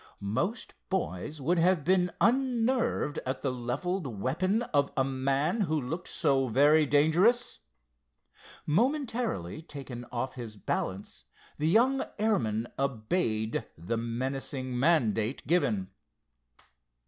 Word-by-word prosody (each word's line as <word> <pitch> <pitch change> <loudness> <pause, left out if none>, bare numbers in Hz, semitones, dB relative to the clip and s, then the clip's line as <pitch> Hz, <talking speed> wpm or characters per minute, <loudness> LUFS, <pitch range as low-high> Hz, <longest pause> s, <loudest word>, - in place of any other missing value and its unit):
Most 195 - -2 0.2
boys 155 - -2
would 170 +6 +1
have 175 -2 +3
been 180 0 +3
unnerved 240 - +1
at 130 0 -4
the 135 - +1
leveled 135 +8 -2
weapon 155 - 0
of 140 -10 +1
a 135 - +4
man 135 - 0
who 155 -5 +1
looked 160 +7 -4
so 135 -4 +1
very 145 +6 +4
dangerous. 170 - +3 1.1
Momentarily 230 - 0
taken 135 -6 -8
off 125 +2 -2
his 115 -4 -8
balance, 95 -9 -4 0.3
the 155 +2 +2
young 255 +8 +4
airman 120 - 0
obeyed 110 -3 -1
the 85 +8 -3
menacing 130 +2 -3
mandate 125 -6 +2
given. 105 - +1
145 Hz, 110 wpm, -29 LUFS, 120-185 Hz, 1.1 s, a